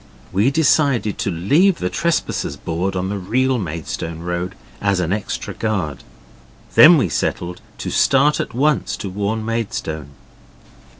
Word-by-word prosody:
We 100 +7 +3
decided 140 -7 +2
to - - -1
leave 145 - +3
the 90 - -2
Trespassers 170 -1 -1
board 90 +4 -2
on 95 +1 -1
the 100 0 -3
real 130 +7 +1
Maidstone 80 -1 -5
road, 90 +2 -3 0.3
as 100 -2 +1
an 90 0 0
extra 105 -1 -4
guard. 95 -10 -2 0.7
Then 165 +2 +9
we 130 - +2
settled 85 +2 -2 0.2
to - - -4
start 140 +2 +3
at - - -4
once 150 +3 +1
to 100 - -5
warn 105 +3 -2
Maidstone. 95 -10 -3
100 Hz, 140 wpm, -20 LUFS, 90-130 Hz, 0.7 s, Then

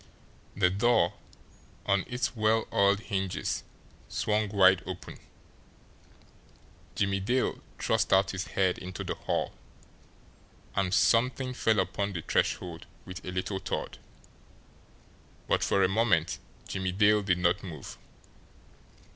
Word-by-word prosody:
The 90 -3 +3
door, 105 -2 +3 0.7
on 100 -1 +2
its 125 +1 -2
well 110 0 +2
oiled 100 +1 +3
hinges, 95 -4 -2 0.5
swung 105 -1 0
wide 95 -2 +5
open. 90 -1 -7 1.8
Jimmie 100 -1 +1
Dale 125 +7 0 0.2
thrust - - +1
out 95 0 +4
his 95 0 -4
head 95 -2 +1
into 90 0 -6
the - - -2
hall - - -2 1.2
and 95 -2 +1
something 125 +5 +2
fell 110 -3 +2
upon 100 +2 -1
the 85 -3 -4
threshold 85 -2 -1 0.2
with 95 +2 -8
a - - -6
little 95 +1 -2
thud - - -4 1.5
but - - +2
for 100 - +3
a - - +5
moment 95 -5 +1 0.3
Jimmie 95 -1 -2
Dale 105 +2 +4
did 95 -3 +1
not 90 +2 +2
move. 80 -8 -8
100 Hz, 120 wpm, -29 LUFS, 95-105 Hz, 1.8 s, wide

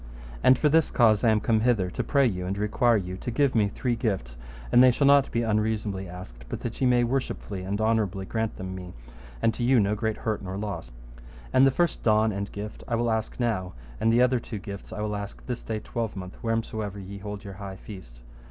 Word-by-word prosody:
And 130 - +6
for 150 - +3
this 160 +1 +4
cause 110 -3 +4
I 115 - +5
am 110 -1 +4
come 110 +1 +2
hither, 110 -6 +2
to - - -2
pray 140 -2 +3
you 90 -6 -1
and 95 +2 -2
require 115 +3 +2
you 90 -2 -4
to 120 - -5
give 135 +3 +2
me 105 -3 +3
three 120 +4 -1
gifts, 95 - -2 0.4
and 125 - +7
they 130 - +8
shall 135 +3 +2
not 140 -1 +6
be 115 - 0
unreasonably 105 -3 -1
asked, 75 -10 -10
but - - -5
that 120 +2 -5
ye 130 - +4
may 125 -1 +4
worshipfully 120 -6 -2
and 100 +3 -3
honourably 110 -4 +1
grant 110 +2 -2
them 95 0 -5
me, 90 -1 -8 0.5
and 115 - +3
to 120 - -4
you 125 0 +5
no 100 0 +2
great 110 0 -1
hurt 110 -2 -2
nor 95 0 -5
loss. 100 -5 -5 0.6
And 130 +1 +6
the - - +6
first 170 +5 0
don 110 0 +3
and 100 0 -4
gift 105 +1 -7
I 120 - 0
will 120 0 +1
ask 110 +2 -2
now, 100 -7 -1 0.3
and 115 - +3
the 120 +2 +5
other 125 0 +3
two 115 -1 -6
gifts 100 +1 -8
I 110 -1 -5
will 105 0 -2
ask 100 -1 -7
this 125 -2 -4
day 110 - -3
twelvemonth, 100 -5 -5
wheresomever 110 -3 -2
ye 100 +1 -8
hold 105 0 -6
your 100 - -8
high 95 -1 -6
feast. 90 - -11
110 Hz, 230 wpm, -26 LUFS, 100-120 Hz, 0.6 s, they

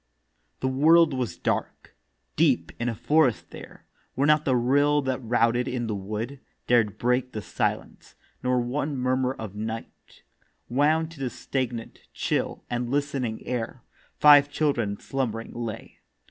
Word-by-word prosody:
The 130 - 0
World 155 +4 +5
was 125 -3 -3
dark. - - -3 0.4
Deep - - +2
in 120 +1 0
a 115 - -3
forest 150 0 +2
there, - - -12 0.3
Where 135 - +1
not 150 0 +4
the 130 - +2
rill 145 +4 +3
that 130 0 -2
routed 120 +2 +2
in 125 -2 -2
the 110 - -2
wood 110 +7 -5 0.3
Dared 110 -4 +2
break 125 +2 0
the 110 - -4
silence, - - -3 0.3
nor 125 0 +1
one 140 +4 -2
murmur 130 +1 0
of 110 -6 -7
night 110 +2 -7 0.4
Wound 155 +5 +2
to 160 - -13
the 130 -2 -2
stagnant, 120 -2 -4 0.2
chill, - - -2
and 120 0 -2
listening 135 -5 -2
air, 120 0 -4 0.3
Five 145 -1 +7
children 120 -9 0
slumbering 115 -4 -3
lay. 115 -2 -6
125 Hz, 145 wpm, -26 LUFS, 115-140 Hz, 0.4 s, Five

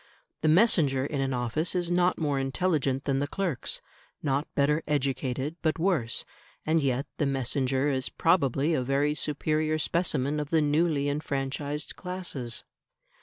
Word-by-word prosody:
The 155 - +3
messenger 155 - +4
in 145 -1 -2
an 135 0 0
office 125 +8 -1
is 175 -1 0
not 180 +1 +3
more 145 -4 0
intelligent 135 -1 0
than 135 -1 +1
the 145 - 0
clerks, 170 -6 -3 0.4
not 140 0 0
better 150 +2 +2
educated, 140 +1 -1
but 160 -1 +1
worse; 165 -10 0 0.4
and 160 +1 +3
yet 135 0 0
the 145 - +1
messenger 135 0 0
is 130 -3 0
probably 160 -2 +2
a 150 - +1
very 140 +3 +1
superior 155 +1 0
specimen 150 -3 0
of 150 -1 -3
the 160 - +3
newly 150 -1 +2
enfranchised 145 0 -2
classes. 175 - -3
145 Hz, 145 wpm, -28 LUFS, 135-160 Hz, 0.4 s, messenger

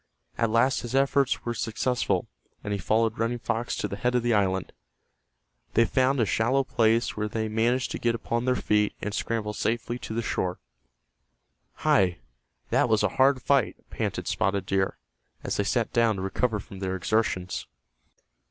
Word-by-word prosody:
At 115 - +1
last 115 +4 +3
his 120 +2 -4
efforts 135 0 +2
were 120 - -1
successful, 120 +1 -1 0.4
and 105 - -2
he 100 - -2
followed 110 +2 +1
Running 115 +2 0
Fox 115 0 -2
to - - -2
the 100 - -6
head 125 +3 0
of 125 - +2
the 120 -1 +2
island. 95 -3 +1 1.0
They 115 - +5
found 130 +3 +2
a 115 - +3
shallow 120 +7 +2
place 115 -2 +2
where 105 0 -1
they 110 +1 -2
managed 115 +4 +1
to - - -4
get 115 -1 +1
upon 115 +1 -2
their 130 0 +2
feet 105 -3 +1
and 105 - -4
scramble 110 -1 -2
safely 120 +2 -2
to 110 - -6
the 115 - -1
shore. 90 -4 -1 1.3
"Hi, 90 -3 +4 0.5
that - - +3
was 110 -2 +3
a 105 - +3
hard 130 -1 +4
fight," 140 -4 +2 0.2
panted - - -3
Spotted 95 0 0
Deer, 95 0 0 0.5
as - - -2
they - - +2
sat - - 0
down 115 -2 +3
to 95 - -4
recover 105 +3 0
from 100 -1 -10
their 95 -1 -2
exertions. 95 -1 -1
115 Hz, 175 wpm, -27 LUFS, 105-120 Hz, 1.3 s, They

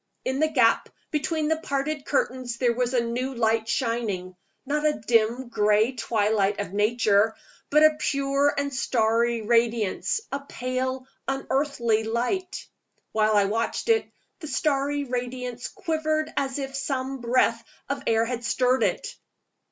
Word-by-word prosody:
In 265 +1 -1
the 315 - +4
gap 255 -7 +3 0.2
between 310 0 0
the 320 +1 +1
parted 280 0 -2
curtains 255 -4 -1
there 240 -1 +2
was 250 +1 -1
a 240 - +3
new 255 +3 -3
light 225 -1 +1
shining; 225 -8 -1 0.3
not 295 +2 0
the 305 0 +3
dim 230 +1 +1
gray 210 +1 +3
twilight 210 -5 0
of 200 -2 -4
Nature, 210 0 +3 0.3
but 300 +1 +5
a 310 0 +6
pure 275 0 +1
and 280 0 -1
starry 235 -2 +1
radiance, 230 - +1
a 280 - -2
pale, 260 -1 -3 0.2
unearthly 270 -4 0
light. 250 - -2 0.5
While 215 0 +2
I 205 -1 +4
watched 225 - -2
it, 445 -1 +2 0.3
the 315 - -7
starry 285 -1 0
radiance 250 -1 -4
quivered 310 -1 -2
as 270 -1 -1
if 270 -1 -4
some 270 -1 -2
breath 240 +2 +2 0.2
of - - -3
air 225 0 +3
had 240 0 -4
stirred 250 +2 +2
it. - - 0
250 Hz, 145 wpm, -25 LUFS, 225-280 Hz, 0.5 s, a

